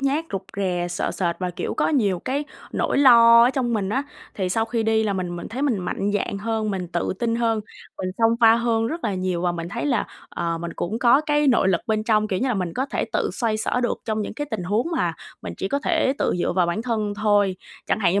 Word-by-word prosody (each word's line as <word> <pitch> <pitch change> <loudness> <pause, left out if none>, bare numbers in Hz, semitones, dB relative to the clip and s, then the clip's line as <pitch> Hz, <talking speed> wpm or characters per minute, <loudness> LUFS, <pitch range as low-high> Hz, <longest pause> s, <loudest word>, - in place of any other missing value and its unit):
nhát, 280 +4 0
rụt 195 -1 -2
rè, 180 -3 -1
sợ 175 - -2
sệt 170 -3 -1
và, 180 -1 -2
kiểu, 175 - -4
có - - +1
nhiều 210 - +1
cái 270 +9 -2 0.3
nỗi - - 0
lo 235 -4 +8
ở 245 - +4
trong 255 -3 -1
mình 205 -4 -1
á, 260 +7 0 0.3
thì 190 -2 -2
sau 225 +5 +1
khi 230 0 -1
đi 220 0 +2
là 210 -2 0
mình 180 -2 -3
mình 175 - -7
thấy 255 +5 -4
mình 265 -8 +1
mạnh 190 +2 -2
dạn 200 0 -1
hơn, 220 0 -1
mình 185 -3 -3
tự 175 0 -1
tin 230 -1 0
hơn, 230 -2 +1 0.4
mình 185 - -2
xông 230 0 +4
pha 225 -1 +7
hơn 230 -1 +1
rất 325 +8 -4
là 210 -3 0
nhiều 185 -2 -2
và 175 -1 +1
mình 170 -1 -5
thấy 200 - -3
là, 245 -7 +1 0.2
ờ, 170 -1 -3
mình 170 0 -5
cũng 210 +6 -2
có 240 +3 +5
cái 295 -1 +1
nội 240 -7 +4
lực 175 -3 +2
bên 215 -1 0
trong, 215 -1 +2
kiểu 185 - -1
như 265 - 0
là, 250 - +1
mình 180 -4 -2
có 260 +2 -1
thể - - -2
tự - - 0
xoay 230 -4 -1
xở 220 +3 -1
được 240 - -1
trong 215 -1 -1
những 210 - -6
cái 290 +5 -4
tình - - -3
huống 205 - 0
mà - - +1 0.3
mình - - -6
chỉ - - -3
có 280 - 0
thể 310 -3 +1
tự - - +1
dựa - - 0
vào 180 -1 +2
bản 175 +6 -2
thân 215 -4 -1
thôi. 205 -2 +2 0.3
Chẳng - - 0
hạn 175 -4 +3
như 200 - +2
215 Hz, 265 wpm, -23 LUFS, 185-240 Hz, 0.4 s, lo